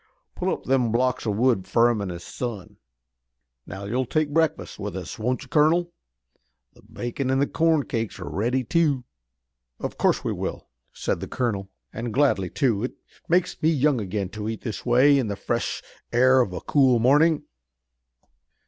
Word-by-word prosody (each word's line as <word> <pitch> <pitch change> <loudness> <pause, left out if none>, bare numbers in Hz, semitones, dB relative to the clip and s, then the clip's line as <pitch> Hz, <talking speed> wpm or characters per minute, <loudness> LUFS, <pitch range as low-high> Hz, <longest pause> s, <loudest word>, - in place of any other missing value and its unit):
Pull - - -1
up - - -3
them 125 -3 +1
blocks 125 +1 0
o' - - +2
wood 105 -2 +1
fur 120 +1 +4
him 110 -3 -2
an' 100 - -3
his 85 -1 -7
son. 115 -7 -6 0.9
Now 95 +2 -7
you'll 125 +5 -1
take 155 0 0
breakfast 160 0 0
with - - -5
us, - - -7
won't 125 +3 -1
you, - - -14
colonel? 170 +3 +2 0.8
The - - -20
bacon 120 +2 -4
an' 130 - +2
the 140 - +3
corn 160 -1 +2
cakes 115 -4 -3
are 90 - -7
ready, 120 +6 0
too." 155 -5 +1 0.8
"Of - - -5
course - - +2
we - - -1
will," - - -5 0.2
said - - -2
the - - -5
colonel, 105 -6 -2 0.2
"and 115 +1 -4
gladly, 110 -8 +2
too. 120 -7 0
It 125 - -3 0.4
makes 180 +1 +1
me 155 - +4
young 145 -5 +2
again 100 -1 -3
to 105 +2 -5
eat 110 - -5
this 115 0 -6
way 135 +4 +5
in 125 - -1
the 100 - -3
fresh - - -2 0.3
air 130 +2 +5
of 105 - -1
a 90 - -5
cool 130 -4 +3
morning." 145 +6 +4
125 Hz, 180 wpm, -24 LUFS, 110-145 Hz, 0.9 s, way